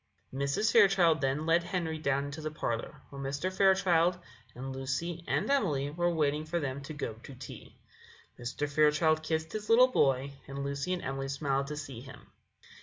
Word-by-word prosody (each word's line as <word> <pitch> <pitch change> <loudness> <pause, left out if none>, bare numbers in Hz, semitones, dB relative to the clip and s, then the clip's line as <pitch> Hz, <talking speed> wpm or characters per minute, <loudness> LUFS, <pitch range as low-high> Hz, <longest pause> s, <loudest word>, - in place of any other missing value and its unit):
Mrs. 140 +11 0
Fairchild 190 - +5
then 135 +3 0
led 165 +1 +4
Henry 170 -3 -3
down 140 -2 0
into 145 +2 -6
the 155 - -3
parlour, 115 -6 -4
where 140 -1 -7
Mr. 145 +7 -3
Fairchild 185 -3 +4 0.4
and 130 +2 -6
Lucy 155 +6 -3
and - - 0
Emily 150 - +1
were 175 +3 +1
waiting 150 -2 +1
for 165 +2 -2
them 140 -2 -3
to 140 +3 -7
go 140 -6 -3
to 135 - -11
tea. 125 - -11 0.6
Mr. 125 +4 -3
Fairchild 155 +2 +3
kissed 160 0 -2
his 210 -1 -5
little 250 +3 +7
boy, 135 - +2 0.2
and 140 0 -5
Lucy 140 +4 -3
and 180 - -3
Emily 135 0 -3
smiled 140 0 -1
to 150 0 -5
see 135 -5 -7
him. 130 -1 -13
150 Hz, 180 wpm, -30 LUFS, 135-170 Hz, 0.6 s, little